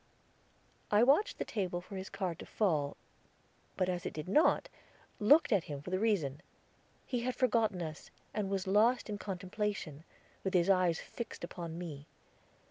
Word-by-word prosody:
I 210 Hz, +2 st, +5 dB
watched 285 Hz, -, +4 dB
the -, -, -2 dB
table 185 Hz, -5 st, -2 dB
for 185 Hz, +3 st, -10 dB
his 190 Hz, 0 st, -5 dB
card 185 Hz, -5 st, -3 dB
to -, -, -9 dB
fall, 155 Hz, -9 st, 0 dB, 0.8 s
but 185 Hz, -, +2 dB
as 180 Hz, -1 st, -2 dB
it -, -, -4 dB
did 155 Hz, +1 st, -5 dB
not, 300 Hz, -, +4 dB, 0.5 s
looked 280 Hz, +9 st, +6 dB
at 200 Hz, -6 st, +3 dB
him 145 Hz, -2 st, -5 dB
for 150 Hz, +6 st, -8 dB
the 185 Hz, -, +1 dB
reason. 170 Hz, -10 st, +1 dB, 0.6 s
He 250 Hz, -, -1 dB
had 250 Hz, +1 st, -2 dB
forgotten 220 Hz, -7 st, +2 dB
us, 155 Hz, -1 st, -7 dB, 0.2 s
and 210 Hz, -3 st, -1 dB
was 195 Hz, -1 st, -1 dB
lost 215 Hz, +4 st, +3 dB
in 205 Hz, -, -4 dB
contemplation, 190 Hz, -5 st, -3 dB, 0.4 s
with 190 Hz, -1 st, -1 dB
his 180 Hz, +2 st, +5 dB
eyes 180 Hz, -3 st, +3 dB
fixed 235 Hz, -6 st, -7 dB
upon 170 Hz, -1 st, -6 dB
me. 150 Hz, -5 st, -7 dB
190 Hz, 165 wpm, -33 LUFS, 170-210 Hz, 0.8 s, looked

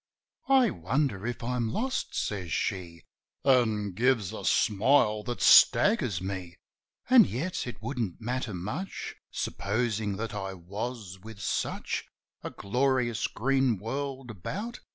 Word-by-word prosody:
"I 260 Hz, -6 st, +5 dB
wonder 115 Hz, -, -1 dB
if 120 Hz, -1 st, -4 dB
I'm 120 Hz, -1 st, -1 dB
lost?" 260 Hz, -, -2 dB
says 95 Hz, -5 st, -2 dB
she, 85 Hz, -5 st, -3 dB, 0.4 s
An' 110 Hz, -6 st, +3 dB
gives 115 Hz, 0 st, +1 dB
a -, -, -6 dB
smile 110 Hz, 0 st, +3 dB
that 120 Hz, -4 st, -3 dB
staggers 130 Hz, -, +6 dB
me. 95 Hz, -2 st, -5 dB, 0.5 s
"An' 250 Hz, -4 st, +8 dB
yet, 165 Hz, +4 st, -3 dB
it 110 Hz, -4 st, -8 dB
wouldn't 115 Hz, -7 st, -3 dB
matter 120 Hz, -2 st, -3 dB
much 120 Hz, -, -5 dB
Supposing 105 Hz, -1 st, -2 dB
that 115 Hz, +1 st, -4 dB
I 95 Hz, -2 st, -4 dB
was, 100 Hz, +2 st, -6 dB
with 110 Hz, +1 st, -11 dB
such 100 Hz, -, -2 dB, 0.4 s
A -, -, -5 dB
glorious 125 Hz, +1 st, 0 dB
green 130 Hz, -1 st, +1 dB
world 130 Hz, +4 st, -4 dB
about. 200 Hz, -, -5 dB
115 Hz, 125 wpm, -28 LUFS, 100-130 Hz, 0.5 s, An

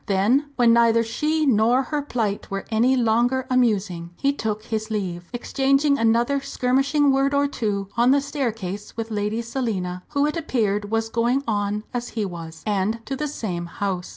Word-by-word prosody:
Then, 210 Hz, +9 st, +2 dB
when 235 Hz, -2 st, +5 dB
neither 230 Hz, -1 st, +4 dB
she 300 Hz, +7 st, 0 dB
nor 240 Hz, +1 st, +3 dB
her 295 Hz, +3 st, -2 dB
plight 225 Hz, -8 st, -2 dB
were 195 Hz, 0 st, -4 dB
any 240 Hz, +4 st, +3 dB
longer 245 Hz, +2 st, +2 dB
amusing, 205 Hz, -9 st, +1 dB
he 280 Hz, 0 st, +1 dB
took 215 Hz, -5 st, -3 dB
his 220 Hz, -1 st, -3 dB
leave, 180 Hz, -5 st, -4 dB
exchanging 275 Hz, +3 st, +1 dB
another 235 Hz, +5 st, +2 dB
skirmishing 275 Hz, +3 st, +2 dB
word 275 Hz, +1 st, +2 dB
or 285 Hz, 0 st, +3 dB
two 205 Hz, -7 st, -2 dB
on 240 Hz, +1 st, +4 dB
the 280 Hz, +2 st, +5 dB
staircase 225 Hz, -10 st, -4 dB
with 225 Hz, 0 st, -4 dB
Lady 210 Hz, +2 st, -1 dB
Selina, 205 Hz, -8 st, -3 dB
who 285 Hz, -1 st, +1 dB
it 300 Hz, -, -1 dB
appeared 210 Hz, -9 st, -1 dB
was 225 Hz, 0 st, 0 dB
"going 235 Hz, +4 st, +1 dB
on" 205 Hz, -1 st, -1 dB
as 245 Hz, 0 st, -3 dB
he 215 Hz, -, +1 dB
was, 165 Hz, -3 st, -8 dB
and 215 Hz, +2 st, -1 dB
to 270 Hz, -, -3 dB
the 300 Hz, +2 st, -2 dB
same 180 Hz, -11 st, -4 dB
house. 185 Hz, 0 st, -3 dB
230 Hz, 175 wpm, -23 LUFS, 205-270 Hz, -, when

